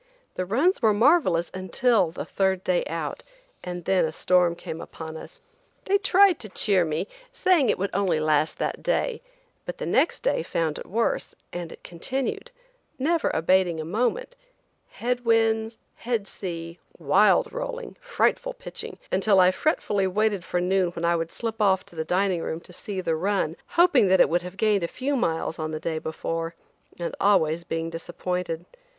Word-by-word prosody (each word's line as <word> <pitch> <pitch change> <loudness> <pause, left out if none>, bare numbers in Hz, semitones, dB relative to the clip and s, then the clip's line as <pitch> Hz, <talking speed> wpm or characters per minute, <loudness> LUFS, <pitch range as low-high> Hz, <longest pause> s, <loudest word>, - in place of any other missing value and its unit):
The 185 - -3
runs 280 - +2
were 220 -3 +4
marvelous 195 - +3
until 190 +1 +1
the 165 - -6
third 190 -1 0
day 180 -1 +1
out, 165 -2 -4 0.4
and 175 -1 -6
then 190 -1 +3
a 160 - 0
storm 175 +1 +2
came 165 -1 -7
upon 160 -1 -8
us. - - -11 0.4
They 400 +1 +3
tried 390 -3 +5
to 215 - -6
cheer 190 -1 +2
me, 160 +4 -2 0.2
saying 345 -8 +3
it - - +2
would 195 +2 -2
only 185 -5 +1
last 155 0 +1
that - - -2
day, - - 0 0.4
but - - -6
the - - -4
next - - +2
day - - +1
found 160 - -2
it - - -9
worse, 230 +4 -1 0.2
and 175 -2 -5
it - - -13
continued, 260 - -4 0.5
never 320 +5 +1
abating 175 0 +2
a 155 - -4
moment; 250 - -1 0.5
head 250 - -2
winds, 225 -1 +2 0.2
head 230 -4 -2
sea, 170 -3 -6 0.2
wild 180 +7 +3
rolling, - - -5
frightful - - 0
pitching, - - -7
until 195 +1 +3
I 180 0 +6
fretfully 200 - 0
waited 205 0 0
for 175 - -1
noon 185 0 +2
when 170 0 -3
I 170 0 +3
would 165 0 -2
slip 225 -1 -4
off 190 -2 +3
to - - -18
the 160 - -2
dining 180 +1 +1
room 160 - -3
to 180 - -16
see 190 +1 -5
the 165 -3 0
run, 185 -2 0 0.2
hoping 345 - +5
that 190 0 +4
it - - +6
would 175 +1 +1
have 180 +2 -9
gained 210 -2 +2
a 170 - -1
few 270 +9 -2
miles 165 -9 -1
on 155 0 -2
the 155 0 -4
day 160 0 -2
before, 165 +1 -4 0.4
and 170 -1 -4
always 170 -5 +3
being 165 0 -3
disappointed. 175 0 -4
185 Hz, 180 wpm, -25 LUFS, 165-225 Hz, 0.5 s, I